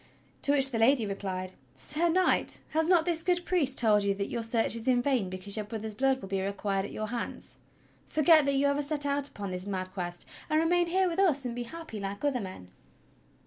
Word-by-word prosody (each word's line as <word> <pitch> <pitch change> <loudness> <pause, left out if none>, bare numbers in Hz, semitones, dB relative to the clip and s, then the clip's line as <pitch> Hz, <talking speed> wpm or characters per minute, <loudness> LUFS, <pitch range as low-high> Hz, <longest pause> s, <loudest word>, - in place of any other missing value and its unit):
To 285 - +2
which 270 -1 +5
the 230 - -1
lady 235 0 +4
replied: 190 -2 -4 0.2
"Sir 335 +3 +2
Knight, 365 +2 +2
has 320 +1 0
not 345 -3 +4
this 335 -2 0
good 355 0 0
priest 285 -8 +1
told 210 -3 +4
you 200 0 +1
that 200 0 -4
your 235 - -2
search* 225 -1 +1
is 230 +2 -6
in 250 -1 +4
vain 245 -7 0
because 185 +2 -2
your 215 - -2
brother's 220 -1 -5
blood 265 +4 +1
will - - -6
be 195 0 -2
required 195 0 -2
at - - -8
your 215 0 -4
hands.^ 240 0 -5 0.5
Forget 310 -1 +5
that 280 0 +1
you 275 +1 +2
ever 280 +1 +2
set 290 0 +1
out 280 0 0
upon 200 -2 -6
this 180 +1 -5
mad 185 -2 -4
Quest, 175 -2 -5 0.2
and 310 - +3
remain 345 +2 +2
here 375 +2 +2
with 345 +1 -2
us 300 -9 +2
and 245 - -3
be 240 0 -4
happy 320 -5 -8
like 200 +5 -5
other 265 -4 0
men." 185 - -9
245 Hz, 225 wpm, -29 LUFS, 200-305 Hz, 0.5 s, which